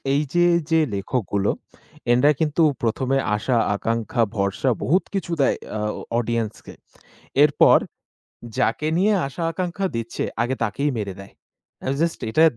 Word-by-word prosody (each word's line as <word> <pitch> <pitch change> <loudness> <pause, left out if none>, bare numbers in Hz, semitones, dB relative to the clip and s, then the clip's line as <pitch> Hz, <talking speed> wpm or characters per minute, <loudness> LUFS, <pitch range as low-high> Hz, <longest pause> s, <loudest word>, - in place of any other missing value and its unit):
এইযে 150 +4 +2 0.3
যে 160 - +4 0.2
লেখকগুলো, 100 -1 -1 0.6
এনারা 140 +5 +5
কিন্তু 155 +1 +2 0.2
১ম 120 +3 -1
এ - - +4 0.2
আশা, 120 +4 0 0.2
আকাঙ্খা, 115 +3 -1
ভরসা 100 +6 0
বহুত 180 +8 +2
কিছু 185 -3 -2
দেয় 135 - +3 0.2
আ - - -3 0.4
অডিয়েন্সকে। 115 -2 -3 0.7
এরপর 145 -1 +6 0.8
যাকে 150 +3 +1
নিয়ে 205 +4 +3
আশা, 140 +5 -5
আকাঙ্খা 185 +2 -2
দিচ্ছে, 115 0 -3 0.2
আগে 125 +2 0
তাকেই 115 +7 0
মেরে 100 -3 -3
দেয়। 100 - -12 0.5
আ - - +1
জাস্ট 165 -1 0
এটা 155 - +4
130 Hz, 135 wpm, -23 LUFS, 115-160 Hz, 0.8 s, এরপর